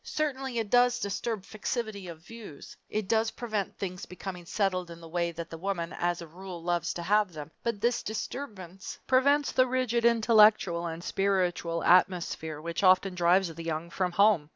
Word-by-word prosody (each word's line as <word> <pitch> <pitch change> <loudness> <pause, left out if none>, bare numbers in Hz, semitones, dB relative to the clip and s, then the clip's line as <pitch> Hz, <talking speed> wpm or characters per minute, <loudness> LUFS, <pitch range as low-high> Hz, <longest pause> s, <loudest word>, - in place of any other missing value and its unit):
Certainly 270 -5 -2
it 220 -3 -2
does 245 0 +4
disturb 200 +1 -3
fixity 215 -2 -4
of 165 -2 -9
views. 220 -10 -11
It 215 -2 -2
does 225 +1 +2
prevent 215 -5 -4
things 185 -2 -5
becoming 180 -1 -8
settled 185 -3 0
in 170 0 -10
the 165 - -11
way 170 +1 -1
that 165 0 -7
the 165 - -7
woman, 175 -2 -3
as 175 0 -1
a - - -8
rule, 175 +1 -9
loves 175 0 0
to 170 - -4
have 205 0 +2
them, 155 0 -8
but 230 -4 -2
this 240 0 +1
disturbance 205 -5 -6
prevents 280 +3 +3
the 255 0 +3
rigid 250 -2 0
intellectual 215 -6 +4
and 165 +1 -6
spiritual 180 -4 0
atmosphere 175 -4 +2
which 170 +2 -4
often 185 0 +4
drives 175 0 +3
the 165 +1 -8
young 165 +1 -3
from 180 -1 -1
home. 200 -6 +4
190 Hz, 175 wpm, -29 LUFS, 170-220 Hz, -, does